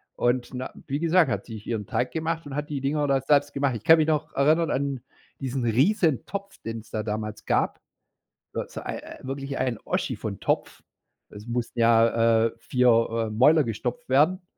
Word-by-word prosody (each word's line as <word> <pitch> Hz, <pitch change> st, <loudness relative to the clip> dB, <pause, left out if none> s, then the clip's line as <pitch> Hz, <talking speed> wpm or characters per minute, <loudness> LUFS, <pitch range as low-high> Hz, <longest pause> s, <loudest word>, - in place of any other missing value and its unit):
und 120 Hz, +1 st, 0 dB
na 130 Hz, +1 st, -5 dB, 0.2 s
wie 140 Hz, +2 st, -2 dB
gesagt, 170 Hz, +1 st, +3 dB
hat -, -, -2 dB
sie 115 Hz, -, -9 dB
sich 105 Hz, -, -11 dB
ihren 110 Hz, -4 st, -2 dB
Teig 125 Hz, -, -1 dB
gemacht 165 Hz, 0 st, -2 dB
und 140 Hz, -, -7 dB
hat 150 Hz, +1 st, -3 dB
die 145 Hz, -2 st, -2 dB
Dinger 145 Hz, +1 st, 0 dB
da 135 Hz, -1 st, +2 dB
selbst 145 Hz, +1 st, +2 dB
gemacht. 140 Hz, -3 st, 0 dB
Ich 110 Hz, -, -7 dB
kann 165 Hz, +5 st, +7 dB
mich 155 Hz, -1 st, +2 dB
noch 155 Hz, -1 st, 0 dB
erinnern 155 Hz, +4 st, +3 dB
an 140 Hz, -2 st, -1 dB, 0.4 s
diesen 130 Hz, -1 st, -2 dB
Riesentopf, 175 Hz, -, +1 dB
den's 115 Hz, -1 st, -6 dB
da 110 Hz, -1 st, -2 dB
damals 110 Hz, -1 st, -4 dB
gab -, -, 0 dB, 0.7 s
so -, -, -2 dB
so -, -, -7 dB
ei -, -, -7 dB
wirklich 135 Hz, +1 st, -5 dB
ein 125 Hz, -4 st, -1 dB
Oschi -, -, -1 dB
von -, -, -5 dB
Topf. -, -, -2 dB, 0.5 s
Es 105 Hz, +1 st, -11 dB
mussten 120 Hz, 0 st, -3 dB
ja, 115 Hz, 0 st, +4 dB
äh, 115 Hz, -, -2 dB
4, 125 Hz, +2 st, +1 dB, 0.4 s
äh, 110 Hz, -, -5 dB
Mäuler 145 Hz, +8 st, +5 dB
gestopft 115 Hz, +2 st, -4 dB
werden. 155 Hz, +8 st, +3 dB
135 Hz, 190 wpm, -25 LUFS, 115-150 Hz, 0.7 s, kann